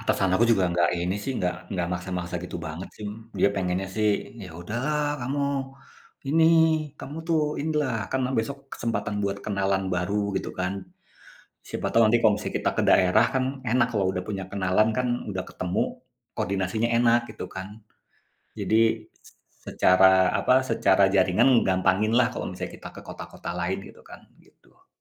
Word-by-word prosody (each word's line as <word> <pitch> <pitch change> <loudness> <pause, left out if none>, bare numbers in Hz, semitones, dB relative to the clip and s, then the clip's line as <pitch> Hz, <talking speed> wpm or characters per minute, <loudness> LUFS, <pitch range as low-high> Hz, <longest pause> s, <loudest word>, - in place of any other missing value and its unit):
atasan 100 -4 +1
aku 115 - +4
juga 95 -4 +2
nggak 85 0 +2
ini 90 +2 -1
sih, 135 - -2
nggak 90 -1 0 0.2
nggak 90 -2 -1
maksa-maksa 90 -1 -4
gitu 90 - -6
banget 80 +4 -6
sih, 105 -1 -5 0.3
dia - - +5
pengennya 95 0 -1
sih, 110 -1 +2 0.4
"Ya 90 - -10
udah 105 +6 -5
lah 150 -1 0 0.2
kamu 135 +4 -2 0.9
ini, 160 +2 +4 0.6
kamu 145 +3 -8
tuh 160 -2 +3 0.2
ini 160 +2 -1
lah, 130 -4 -1 0.2
kan 130 - +1 0.2
besok 135 +5 -2 0.2
kesempatan 115 -3 -2
buat 100 0 -1
kenalan 100 -1 0
baru 90 +3 -1 0.2
gitu - - -3
kan, 90 0 -1 1.0
siapa - - -4
tahu 115 - +4
nanti 120 +2 +4
kalau 110 - +6
misalnya - - -5
kita - - +1
ke - - +3
daerah, 95 +5 +5
kan 130 -1 +1 0.3
enak 120 0 +3
kalau 100 -4 0
udah 90 -1 -3
punya 100 -3 -3
kenalan 100 +2 +2
kan 125 -1 +1 0.2
udah 95 -2 -3
ketemu, 90 0 -2 0.5
koordinasinya 100 +4 -1
enak," 120 0 +4
gitu - - -7
kan. 95 0 -5 0.9
Jadi 110 - +1 0.5
s - - -15 0.4
secara 95 0 +5
apa, 130 - +3 0.2
secara 110 -3 +3
jaringan 100 +6 +4 0.2
gampangin 95 +3 +2
lah 125 - +5
kalau - - -4
kita - - -7
ke - - -9
kota-kota 85 - -8
lain 95 +3 -1
gitu - - -16
kan, - - -11 0.2
gitu. - - -28
100 Hz, 165 wpm, -25 LUFS, 95-115 Hz, 1.0 s, kalau